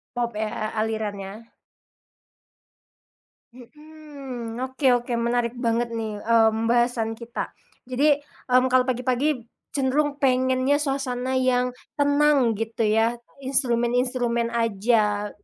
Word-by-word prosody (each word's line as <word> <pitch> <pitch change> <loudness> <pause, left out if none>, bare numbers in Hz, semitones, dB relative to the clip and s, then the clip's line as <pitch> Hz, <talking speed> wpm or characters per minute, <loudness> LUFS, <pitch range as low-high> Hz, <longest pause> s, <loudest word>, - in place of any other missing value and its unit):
Pop 240 -1 -1
ya, 220 - 0 0.2
a - - 0
alirannya? 210 -3 -3 2.2
Mhm, 270 -3 -9
oke 260 +2 -6 0.2
oke 245 - -4
menarik 240 0 0
banget 230 +1 +1
nih, 220 -2 -3
mmm, 225 0 +3
bahasan 240 -2 +1
kita. 235 +2 -6 0.3
Jadi, 280 +3 +3 0.3
mmm, 255 +1 +4
kalau 255 -1 +4
pagi-pagi 255 +1 0 0.3
cenderung 285 +2 +1
pengennya 260 +1 +2
suasana 260 -2 -2
yang 250 -1 +2 0.3
tenang 285 -5 +3
gitu 225 +1 -3
ya, 225 +2 +3 0.3
instrumen-instrumen 245 -2 +1
aja, 210 -2 +1
245 Hz, 100 wpm, -24 LUFS, 230-260 Hz, 2.2 s, mmm